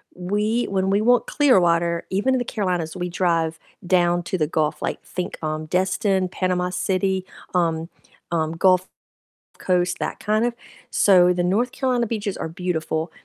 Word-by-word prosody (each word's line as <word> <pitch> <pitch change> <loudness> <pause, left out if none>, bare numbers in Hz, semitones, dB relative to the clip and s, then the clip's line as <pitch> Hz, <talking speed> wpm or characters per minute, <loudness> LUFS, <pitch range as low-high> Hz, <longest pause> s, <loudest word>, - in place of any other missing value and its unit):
we 210 +6 0
when 190 -1 0
we 200 +1 +2
want 245 +1 +3
clear 285 -9 +4
water, 170 -1 +1
even 205 +8 +1
in 255 - +1
the 245 - -2
Carolinas, 180 -8 -2
we 180 -1 -3
drive 165 -2 0 0.3
down 175 -1 +2
to 185 - -2
the 155 - +1
Gulf, 155 -1 -1
like, - - -3
think, 180 - -5
um, 155 0 -2
Destin, 190 +2 +1
Panama 180 0 -1
City, 190 0 0 0.3
um 165 -1 0 0.4
um, 160 -2 0
Gulf 185 +2 +3 0.7
Coast, 180 -1 0
that - - -3
kind 215 +2 +1
of 240 - 0 0.4
So 180 -2 +5
the 175 - -1
North 215 +8 +1
Carolina 250 -3 0
beaches 210 -3 -3
are - - -3
beautiful, 160 -2 -2
180 Hz, 165 wpm, -22 LUFS, 170-200 Hz, 0.7 s, So